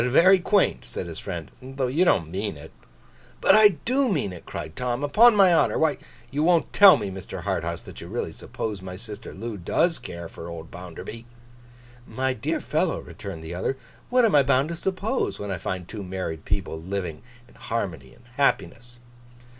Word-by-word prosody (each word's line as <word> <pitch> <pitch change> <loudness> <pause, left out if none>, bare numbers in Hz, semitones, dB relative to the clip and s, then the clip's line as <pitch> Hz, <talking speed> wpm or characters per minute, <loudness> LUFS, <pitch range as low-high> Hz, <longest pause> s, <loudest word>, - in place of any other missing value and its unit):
Very 185 +8 +6
quaint!' 200 +2 +2
said - - -6
his - - -7
friend. 80 -6 -6
'Though 135 +1 -3
you 140 +8 +2
don't 80 - +2
mean 100 -2 -3
it.' 75 +2 -12 0.7
'But - - +5
I 210 -4 +7
do 260 +2 +2
mean 140 - -1
it,' 85 - -12
cried 80 - -6
Tom. 125 +1 -2
'Upon 215 +11 +6
my 190 -3 +6
honour! 165 - +3
Why, 160 -2 +2 0.3
you 145 +2 -1
won't 170 +1 +3
tell 195 -6 +9
me, 100 -5 -4
Mr. 95 -1 -7
Harthouse, - - -2
that - - -11
you - - -8
really - - -3
suppose 105 -3 -5
my 90 -1 -7
sister 105 +1 -8
Loo 110 +2 -6
does 165 - +1
care 85 -1 -7
for 85 - -10
old 80 -1 -8
Bounderby.' 90 +6 -9 0.8
'My 130 0 -1
dear 110 - -2
fellow,' - - 0
returned 80 - -8
the 80 +2 -6
other, 95 +9 -2 0.3
'what 250 -1 +4
am 220 - +2
I 145 - +7
bound 135 +2 +2
to 170 - -3
suppose, 190 +8 -1
when 100 -1 -5
I 95 - -3
find 90 -2 -4
two 105 - -7
married 90 -4 -5
people 95 -5 -2
living 90 -3 -4 0.3
in - - -21
harmony 90 - -4
and 120 - -23
happiness? 120 -3 0
120 Hz, 190 wpm, -25 LUFS, -, 0.8 s, tell